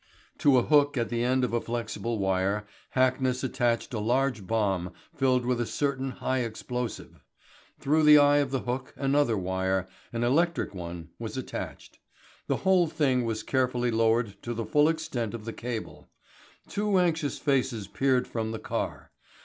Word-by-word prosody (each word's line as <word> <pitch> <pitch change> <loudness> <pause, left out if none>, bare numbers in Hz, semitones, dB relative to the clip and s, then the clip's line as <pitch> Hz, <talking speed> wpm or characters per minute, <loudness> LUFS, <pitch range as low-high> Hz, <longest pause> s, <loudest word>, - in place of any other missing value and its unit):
To 140 -3 +5
a 125 - +4
hook 145 -1 +3
at 115 -2 0
the 120 0 -1
end 130 +1 +2
of 125 - -1
a 120 - +1
flexible 115 0 -3
wire 95 +1 0 0.3
Hackness 130 0 +2
attached 120 -2 0
a 110 - -1
large 120 -2 0
bomb 95 -5 0 0.2
filled 130 -2 +2
with 125 -1 +1
a - - 0
certain 135 -2 -1
high 130 +1 -2
explosive. 125 +1 -5 0.6
Through 155 +3 +2
the 150 0 +9
eye 145 0 +6
of 145 -2 +1
the 135 -1 -1
hook 125 +1 -4
another 140 -4 +2
wire 95 0 -1 0.3
an 115 0 -2
electric 165 +3 +1
one 85 -2 -7
was - - -5
attached. - - -7 0.5
The - - +1
whole 185 -2 +5
thing 130 -6 +1
was 110 -1 -2
carefully 125 -2 0
lowered 115 -2 +1
to 120 0 -4
the 115 0 -3
full 150 +5 +4
extent 145 -9 -2
of 110 -2 -8
the 115 - -5
cable. 115 -2 -6 0.6
Two 205 -1 0
anxious 165 -5 +1
faces 130 -6 0
peered 130 +3 +1
from 110 -1 -3
the 110 - -4
car. - - -4
125 Hz, 165 wpm, -28 LUFS, 115-135 Hz, 0.6 s, the